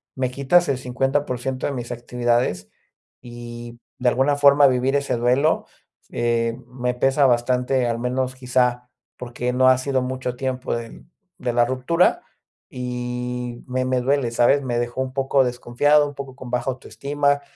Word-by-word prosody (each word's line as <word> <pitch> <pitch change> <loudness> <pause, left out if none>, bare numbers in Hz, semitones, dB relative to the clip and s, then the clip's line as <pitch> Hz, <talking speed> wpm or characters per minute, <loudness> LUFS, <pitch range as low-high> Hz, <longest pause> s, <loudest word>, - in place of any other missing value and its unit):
me 130 -1 -1
quitas 140 +6 +3
el 135 -2 0
50% 130 0 -2
de - - -2
mis 125 -1 -5
actividades 120 -6 -1 0.5
y 120 -1 -9 0.2
de 125 - +3
alguna 135 +4 +2
forma 140 0 +6
vivir 130 +1 +2
ese 140 -2 0
duelo, 125 +6 +1 0.4
eh, 115 -1 0
me 125 0 -3
pesa 135 +2 +3
bastante, 125 +1 +1
al 115 0 -1
menos 125 +1 -1
quizá, 125 -1 0 0.3
porque 125 0 -4
no 130 0 +5
ha 130 - +5
sido 130 0 -1
mucho 125 -1 -3
tiempo 130 -1 -3
de 115 -1 -8 0.4
de 120 -2 -2
la 120 - +4
ruptura 130 +8 +1 0.5
y 125 -1 -5
me 130 0 -1
me 130 -1 0
duele, 130 -2 +1
¿sabes?, 120 +4 +3
me 120 -2 -1
dejó 120 +2 -2
un 130 -1 -4
poco 135 0 +2
desconfiado, 125 +5 +2
un 145 - -9
poco 135 -2 -8
con 130 -3 -10
baja 125 +1 -1
autoestima, 140 +2 -1
125 Hz, 155 wpm, -22 LUFS, 120-135 Hz, 0.5 s, forma